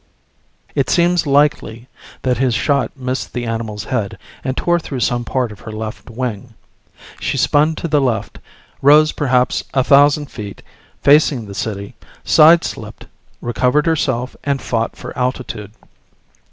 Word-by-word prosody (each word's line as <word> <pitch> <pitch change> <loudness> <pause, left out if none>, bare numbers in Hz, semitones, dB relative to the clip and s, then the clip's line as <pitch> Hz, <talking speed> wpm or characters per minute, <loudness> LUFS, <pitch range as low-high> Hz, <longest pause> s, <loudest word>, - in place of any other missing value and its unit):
It - - 0
seems 175 -1 +2
likely 140 -5 +1 0.4
that 125 -2 0
his 130 -3 +2
shot 140 -1 +1
missed 130 0 -4
the 120 -1 -3
animal's 110 -2 -4
head 110 -5 -3 0.3
and 130 0 -3
tore 175 0 +2
through 135 -6 -5
some 120 0 0
part 125 -1 -1
of 105 - -12
her 110 - -9
left 110 0 -7
wing. 120 -1 -5 0.6
She - - -2
spun 155 +2 +3
to 170 - -4
the 150 -2 +2
left, 115 -6 -2 0.4
rose 150 +2 +6
perhaps 125 -3 +1
a 130 - +3
thousand 145 +2 +4
feet, 105 -4 -8 0.4
facing 140 -4 +4
the 100 - -9
city, 100 -1 -4 0.3
sideslipped, 165 +2 +3 0.4
recovered 125 +5 +1
herself 130 -6 0
and 140 -1 0
fought 115 -3 -2
for - - -9
altitude. 125 -5 -3
125 Hz, 140 wpm, -18 LUFS, 115-145 Hz, 0.6 s, rose